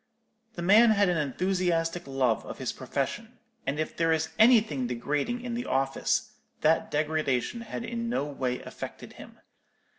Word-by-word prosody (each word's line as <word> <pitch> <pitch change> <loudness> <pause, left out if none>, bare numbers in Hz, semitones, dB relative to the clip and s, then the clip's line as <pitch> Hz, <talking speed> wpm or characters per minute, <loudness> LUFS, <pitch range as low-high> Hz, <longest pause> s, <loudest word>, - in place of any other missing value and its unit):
The 175 - -5
man 215 +6 +7
had 200 -3 +4
an 175 - +1
enthusiastic 170 +2 0
love 130 -4 +1
of - - -7
his - - -2
profession; - - -4 0.3
and 140 +3 -1
if 155 - -2
there 165 0 +2
is 160 0 +1
anything 215 - +5
degrading 145 - -2
in 245 -1 -4
the 240 +1 -3
office, 135 +1 0 0.3
that 160 +1 +3
degradation 155 - 0
had 230 0 -6
in 235 0 -3
no 190 - 0
way 130 -3 -3
affected - - -8
him. - - -13
165 Hz, 155 wpm, -28 LUFS, 140-220 Hz, 0.3 s, man